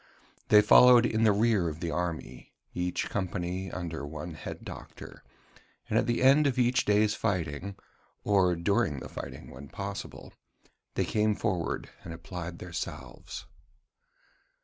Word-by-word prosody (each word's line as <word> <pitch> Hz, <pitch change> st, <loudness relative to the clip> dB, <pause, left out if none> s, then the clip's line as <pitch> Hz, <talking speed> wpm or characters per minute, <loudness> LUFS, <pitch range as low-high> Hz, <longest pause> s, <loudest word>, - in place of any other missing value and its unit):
They 105 Hz, 0 st, +7 dB
followed 125 Hz, 0 st, +8 dB
in 110 Hz, -1 st, 0 dB
the 110 Hz, -, +6 dB
rear 105 Hz, -4 st, +2 dB
of 75 Hz, 0 st, -7 dB
the 85 Hz, 0 st, -3 dB
army 85 Hz, 0 st, -4 dB, 0.2 s
each 90 Hz, 0 st, -2 dB
company 95 Hz, -1 st, -3 dB
under 85 Hz, -4 st, -5 dB
one 75 Hz, +3 st, -6 dB
head 75 Hz, -, -8 dB
doctor; -, -, -10 dB, 0.6 s
and -, -, -2 dB
at -, -, -1 dB
the 120 Hz, +1 st, +1 dB
end 140 Hz, +3 st, +6 dB
of 135 Hz, -, -1 dB
each 125 Hz, +1 st, +2 dB
day's 105 Hz, 0 st, +3 dB
fighting 95 Hz, -3 st, -2 dB, 0.5 s
or 95 Hz, -4 st, +3 dB
during 85 Hz, -2 st, +1 dB
the -, -, -8 dB
fighting -, -, -8 dB
when 70 Hz, +3 st, -10 dB
possible 100 Hz, 0 st, -7 dB, 0.6 s
they -, -, +1 dB
came 105 Hz, 0 st, +1 dB
forward 95 Hz, -7 st, -2 dB, 0.2 s
and 80 Hz, -, -7 dB
applied 85 Hz, 0 st, -7 dB
their 90 Hz, -1 st, -9 dB
salves. -, -, -6 dB
95 Hz, 145 wpm, -29 LUFS, 85-110 Hz, 0.6 s, followed